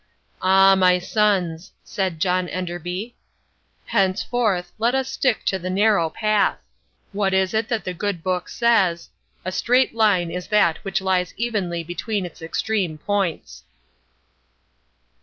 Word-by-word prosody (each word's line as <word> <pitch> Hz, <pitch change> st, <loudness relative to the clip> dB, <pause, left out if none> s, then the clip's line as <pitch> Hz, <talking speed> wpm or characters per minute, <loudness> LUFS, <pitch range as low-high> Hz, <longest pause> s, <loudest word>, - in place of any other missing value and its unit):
"Ah, 195 Hz, +1 st, +6 dB
my 185 Hz, -1 st, +4 dB
sons," 185 Hz, -3 st, 0 dB
said 185 Hz, -5 st, -3 dB
John 180 Hz, +1 st, 0 dB
Enderby, 180 Hz, +5 st, -5 dB, 0.7 s
"henceforth 195 Hz, -1 st, 0 dB
let 235 Hz, +3 st, +2 dB
us 265 Hz, -1 st, 0 dB
stick 265 Hz, -3 st, 0 dB
to 190 Hz, -, 0 dB
the 185 Hz, +1 st, -5 dB
narrow 195 Hz, -3 st, +2 dB
path. 215 Hz, +3 st, +1 dB, 0.5 s
What 200 Hz, -1 st, 0 dB
is 190 Hz, +1 st, +1 dB
it 220 Hz, 0 st, 0 dB
that 225 Hz, -2 st, -1 dB
the 185 Hz, -, -4 dB
Good 180 Hz, -2 st, -3 dB
Book 185 Hz, -1 st, -2 dB
says: 195 Hz, -8 st, +1 dB, 0.3 s
'A 185 Hz, -, -2 dB
straight 250 Hz, +6 st, +2 dB
line 205 Hz, -7 st, +2 dB
is 180 Hz, +1 st, -5 dB
that 205 Hz, -6 st, +3 dB
which 195 Hz, -1 st, -1 dB
lies 185 Hz, -1 st, 0 dB
evenly 195 Hz, -8 st, -2 dB
between 185 Hz, +4 st, -3 dB
its 175 Hz, -1 st, -11 dB
extreme 175 Hz, 0 st, -2 dB
points. 195 Hz, 0 st, -3 dB
190 Hz, 135 wpm, -22 LUFS, 180-215 Hz, 0.7 s, Ah